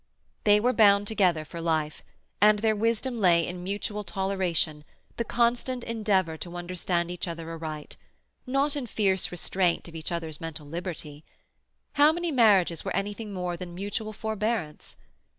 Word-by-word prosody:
They 205 0 +6
were 245 +4 +2
bound 205 -3 +5
together 180 -7 +2
for 170 +2 -7
life, 155 -2 -1 0.4
and 210 0 +7
their 220 +1 +2
wisdom 230 +3 0
lay 170 -4 +4
in 180 0 -6
mutual 205 +2 -3
toleration, 180 -5 -1 0.3
the 235 - 0
constant 240 +2 0
endeavour 200 -8 0
to 175 +2 -7
understand 175 0 -1
each 180 +1 -4
other 165 -1 -5
aright—not 165 - -4
in 275 -4 -3
fierce 195 -4 +1
restraint 180 0 0
of 170 - -11
each 160 +2 -6
other's 160 -3 -4
mental 160 -2 -6
liberty. 160 -2 -6 0.7
How 295 +1 +6
many 345 +1 -2
marriages 200 - +4
were - - -3
anything 205 +2 -3
more 180 -2 -3
than 175 0 -8
mutual 205 +3 -3
forbearance? 215 -6 -3
190 Hz, 150 wpm, -27 LUFS, 170-220 Hz, 0.7 s, and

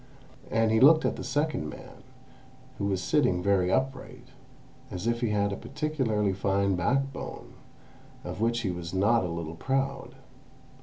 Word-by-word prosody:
And 115 0 +2
he 110 - +3
looked 155 +5 +7
at - - +1
the - - -6
second 145 - -1
man, - - -11 0.8
who 100 - -1
was 95 -2 -1
sitting 90 -11 +2
very 95 -2 +2
upright, 130 +2 -2 0.6
as 90 +3 -6
if 120 0 0
he 120 - +1
had 100 -1 +1
a - - -2
particularly 130 -8 -1
fine 100 0 +1
backbone, 135 +9 -2 0.7
of - - -6
which 115 +1 +1
he 100 -5 -1
was 90 0 -6
not 105 +4 +3
a - - -1
little 85 -1 -5
proud. 135 +8 -2
110 Hz, 155 wpm, -28 LUFS, 95-135 Hz, 0.8 s, looked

